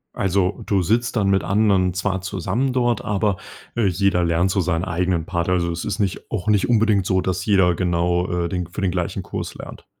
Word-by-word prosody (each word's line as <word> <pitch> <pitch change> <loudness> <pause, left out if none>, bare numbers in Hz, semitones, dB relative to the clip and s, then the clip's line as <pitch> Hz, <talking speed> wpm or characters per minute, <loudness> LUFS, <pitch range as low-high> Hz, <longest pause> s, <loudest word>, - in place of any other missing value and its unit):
Also, 95 0 0
du 100 -2 +1
sitzt 115 +8 0
dann 100 -3 +2
mit 95 -1 +2
anderen 95 -3 +2
zwar 95 +1 -1
zusammen 100 +7 -2
dort 120 -3 +1
aber, 100 -2 0 0.4
äh, 115 -3 +1
jeder 95 -1 +1
lernt 85 +3 +1
so 95 - 0
seinen 85 -1 0
eigenen 90 -1 -1
Part. 85 -1 -2
Also, 85 -2 +1
es 85 - -4
ist 105 +2 -3
nicht 95 -3 -2
auch 110 -1 -4
nicht 105 -2 +3
unbedingt 110 -4 +3
so, 95 0 +1
dass 90 0 -2
jeder 95 -4 +3
genau, 90 0 0
äh, 85 -1 -1
den 90 -2 -3
für 90 +4 -6
den 95 -2 +1
gleichen 90 -2 -3
Kurs - - -5
lernt. - - -10
95 Hz, 210 wpm, -21 LUFS, 90-100 Hz, 0.4 s, nicht